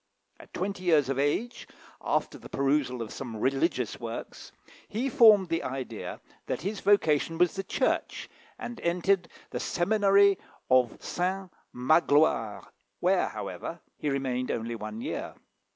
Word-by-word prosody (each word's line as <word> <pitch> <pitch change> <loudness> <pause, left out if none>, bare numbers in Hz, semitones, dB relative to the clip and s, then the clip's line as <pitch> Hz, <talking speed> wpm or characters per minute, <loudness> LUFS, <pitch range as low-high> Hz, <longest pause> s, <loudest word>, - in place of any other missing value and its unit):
At - - -15
twenty 190 0 -3
years 155 -6 +4
of 135 0 -1
age, 175 - -1 0.4
after - - -1
the - - -12
perusal 135 -3 0
of 110 - -8
some 125 -4 -6
religious 130 - 0
works, 115 -1 -7 0.4
he 245 +6 -2
formed 215 -7 +6
the 165 +1 0
idea 130 -4 -5 0.3
that - - -2
his 200 +2 -3
vocation 165 -5 +2
was 180 0 +3
the 195 - -3
Church, - - -1 0.3
and 240 -1 -7
entered 180 +2 +1 0.2
the - - -3
seminary 200 +1 +3 0.3
of 125 -2 +4
Saint 185 +1 -2 0.2
Magloire, 145 -5 +2 0.3
where, - - +2
however, - - -6 0.2
he 150 - -2
remained 130 -2 -1
only 115 +1 -2
one 110 0 -6
year. - - -4
155 Hz, 135 wpm, -28 LUFS, 130-195 Hz, 0.4 s, formed